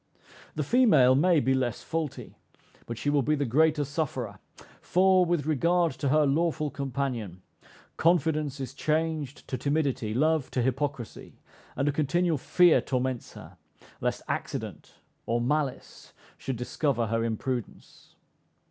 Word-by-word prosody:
The -, -, -1 dB
female 155 Hz, -, +5 dB
may 165 Hz, +4 st, +4 dB
be 130 Hz, -1 st, +1 dB
less 125 Hz, -4 st, -1 dB
faulty; 160 Hz, -4 st, -4 dB, 0.5 s
but 115 Hz, -, -5 dB
she 145 Hz, +5 st, -1 dB
will 145 Hz, -1 st, +3 dB
be 150 Hz, +4 st, +1 dB
the 145 Hz, -1 st, -1 dB
greater 150 Hz, +4 st, +2 dB
sufferer; 130 Hz, -, -4 dB, 0.4 s
for, 185 Hz, +1 st, +4 dB
with 170 Hz, -4 st, 0 dB
regard 170 Hz, +3 st, +2 dB
to 140 Hz, +1 st, -2 dB
her 150 Hz, +2 st, +4 dB
lawful 155 Hz, +1 st, 0 dB
companion, 125 Hz, -9 st, -4 dB, 0.5 s
confidence 155 Hz, -4 st, +1 dB
is 135 Hz, -1 st, -5 dB
changed 155 Hz, -2 st, -2 dB
to 130 Hz, -, -4 dB
timidity, 135 Hz, -7 st, -1 dB
love 155 Hz, +1 st, +1 dB
to 125 Hz, -, +1 dB
hypocrisy, 130 Hz, -2 st, -3 dB, 0.4 s
and 140 Hz, -, 0 dB
a -, -, +3 dB
continual 155 Hz, +2 st, +1 dB
fear 175 Hz, +4 st, +4 dB
torments 130 Hz, -1 st, -3 dB
her, -, -, -12 dB, 0.4 s
lest -, -, -2 dB
accident -, -, -5 dB, 0.3 s
or 115 Hz, +1 st, +1 dB
malice 140 Hz, +2 st, -3 dB, 0.2 s
should 130 Hz, -, -4 dB
discover 125 Hz, +1 st, -1 dB
her 115 Hz, +1 st, -1 dB
imprudence. 115 Hz, +1 st, -5 dB
140 Hz, 135 wpm, -27 LUFS, 125-155 Hz, 0.5 s, female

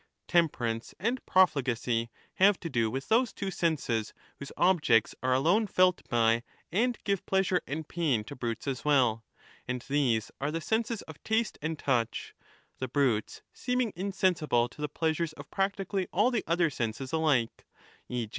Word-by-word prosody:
Temperance 120 Hz, -10 st, 0 dB
and 235 Hz, +7 st, -1 dB
profligacy 125 Hz, -9 st, +2 dB, 0.3 s
have 195 Hz, 0 st, +5 dB
to 165 Hz, -, -5 dB
do 115 Hz, -4 st, +1 dB
with 135 Hz, +4 st, -4 dB
those 235 Hz, +2 st, +3 dB
two 195 Hz, -1 st, -4 dB
senses 135 Hz, -, -1 dB, 0.2 s
whose 140 Hz, -, -8 dB
objects 155 Hz, -, +3 dB
are 130 Hz, +1 st, 0 dB
alone 175 Hz, +11 st, +3 dB
felt 185 Hz, -1 st, +3 dB
by 115 Hz, -1 st, +3 dB, 0.3 s
and 235 Hz, +6 st, +1 dB
give 200 Hz, -3 st, 0 dB
pleasure 190 Hz, -2 st, +2 dB
and 155 Hz, +2 st, -4 dB
pain 150 Hz, -11 st, 0 dB
to -, -, -9 dB
brutes 120 Hz, -2 st, -4 dB
as 135 Hz, -2 st, -2 dB
well; 125 Hz, -7 st, +3 dB, 0.4 s
and 125 Hz, 0 st, -3 dB
these 130 Hz, -6 st, +1 dB
are 140 Hz, -, 0 dB
the 165 Hz, +2 st, -2 dB
senses 225 Hz, +4 st, -1 dB
of 160 Hz, -2 st, -12 dB
taste 220 Hz, +1 st, 0 dB
and 155 Hz, +1 st, -2 dB
touch, 120 Hz, -6 st, -1 dB, 0.5 s
the 130 Hz, -, -2 dB
brutes 125 Hz, -5 st, 0 dB
seeming 250 Hz, -3 st, -1 dB
insensible 180 Hz, -10 st, +1 dB
to -, -, -19 dB
1231^ -, -, -9 dB
the 150 Hz, -, -1 dB
pleasures 160 Hz, 0 st, 0 dB
of 145 Hz, -1 st, -12 dB
practically 195 Hz, -1 st, -1 dB
all 210 Hz, +7 st, +3 dB
the 235 Hz, -4 st, 0 dB
other 170 Hz, -1 st, +2 dB
senses 125 Hz, +2 st, -4 dB
alike, 150 Hz, -8 st, +1 dB, 0.4 s
e. 120 Hz, -3 st, -3 dB
155 Hz, 165 wpm, -29 LUFS, 120-190 Hz, 0.5 s, have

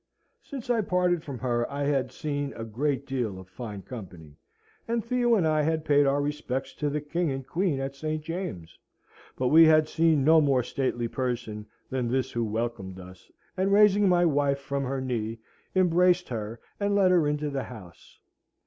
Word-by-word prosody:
Since 255 Hz, -3 st, -5 dB
I 230 Hz, -2 st, +2 dB
parted 180 Hz, -3 st, +1 dB
from 140 Hz, -3 st, -6 dB
her 120 Hz, -1 st, -1 dB
I 140 Hz, +1 st, -2 dB
had 135 Hz, -3 st, 0 dB
seen 145 Hz, 0 st, -3 dB
a 115 Hz, -, -6 dB
great 135 Hz, +5 st, -2 dB
deal 120 Hz, -8 st, -2 dB
of 95 Hz, -1 st, -11 dB
fine 105 Hz, -1 st, -8 dB
company, 90 Hz, -, -10 dB, 0.5 s
and 230 Hz, -1 st, -1 dB
Theo 240 Hz, -1 st, +2 dB
and 180 Hz, -7 st, +2 dB
I 155 Hz, -1 st, +2 dB
had 160 Hz, +1 st, 0 dB
paid 145 Hz, -1 st, +4 dB
our 140 Hz, +1 st, +2 dB
respects 145 Hz, -3 st, -3 dB
to 150 Hz, -, -1 dB
the 150 Hz, +1 st, -1 dB
King 170 Hz, +3 st, -1 dB
and 135 Hz, -1 st, -4 dB
Queen 165 Hz, -1 st, 0 dB
at 135 Hz, 0 st, -3 dB
St. 155 Hz, +2 st, -3 dB
James's; 165 Hz, -, -6 dB, 0.6 s
but 125 Hz, -1 st, +1 dB
we 160 Hz, +3 st, +8 dB
had 155 Hz, -1 st, +5 dB
seen 160 Hz, -3 st, +2 dB
no 160 Hz, +2 st, +6 dB
more 135 Hz, -4 st, +2 dB
stately 120 Hz, -2 st, -2 dB
person 115 Hz, -4 st, -4 dB, 0.2 s
than 130 Hz, -2 st, -1 dB
this 130 Hz, +2 st, -1 dB
who 120 Hz, -, -1 dB
welcomed 110 Hz, -4 st, -3 dB
us, 90 Hz, 0 st, -13 dB, 0.2 s
and 195 Hz, +1 st, 0 dB
raising 205 Hz, -1 st, +5 dB
my 175 Hz, -1 st, +4 dB
wife 145 Hz, -3 st, +2 dB
from 140 Hz, 0 st, -3 dB
her 135 Hz, +1 st, -2 dB
knee, 115 Hz, -3 st, -3 dB, 0.4 s
embraced 180 Hz, 0 st, +3 dB
her 110 Hz, -1 st, -5 dB, 0.2 s
and 200 Hz, 0 st, +1 dB
led 190 Hz, -2 st, +4 dB
her 170 Hz, -5 st, +4 dB
into 150 Hz, 0 st, -1 dB
the 135 Hz, -2 st, -3 dB
house. 100 Hz, -8 st, -13 dB
140 Hz, 185 wpm, -27 LUFS, 120-165 Hz, 0.6 s, we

